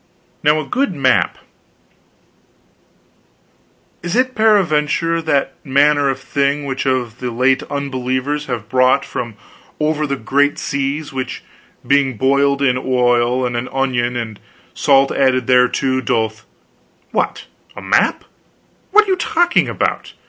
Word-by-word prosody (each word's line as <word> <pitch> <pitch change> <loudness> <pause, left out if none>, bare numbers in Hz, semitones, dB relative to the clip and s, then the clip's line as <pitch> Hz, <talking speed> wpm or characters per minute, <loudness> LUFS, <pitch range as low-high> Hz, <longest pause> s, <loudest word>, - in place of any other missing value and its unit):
Now 150 +1 +3
a 155 - -4
good 255 - -1
map 130 -3 +1 1.7
" - - -39
"Is 175 +3 -3
it 255 +1 +1
peradventure 165 - +2
that 140 -4 0
manner 145 +1 +3
of 135 - -2
thing 140 +1 -1
which 135 0 -3
of 125 -3 -2
late 125 +2 +1
the - - -11
unbelievers 140 +1 -2
have 120 -5 -4
brought 130 +2 +2
from 120 -5 -5 0.4
over 150 0 0
the 140 - -1
great 140 +4 +1
seas, 140 +2 -3
which, 130 -1 -5 0.4
being 135 -2 +2
boiled 140 +2 +2
in 125 -2 +2
oil, 125 -1 +1
and 120 -1 -3
an 120 +2 -3
onion 125 -2 -1
and 110 -3 -5 0.3
salt 135 -1 +3
added 130 -2 +1
thereto, 130 +1 +2
doth 110 -1 -2 0.3
" - - -39
"What, - - -2 0.3
a - - -8
map? - - +1 0.7
What 425 +2 +5
are - - -6
you 375 - +3
talking 345 0 +1
about? - - -2
135 Hz, 135 wpm, -17 LUFS, 125-145 Hz, 1.7 s, What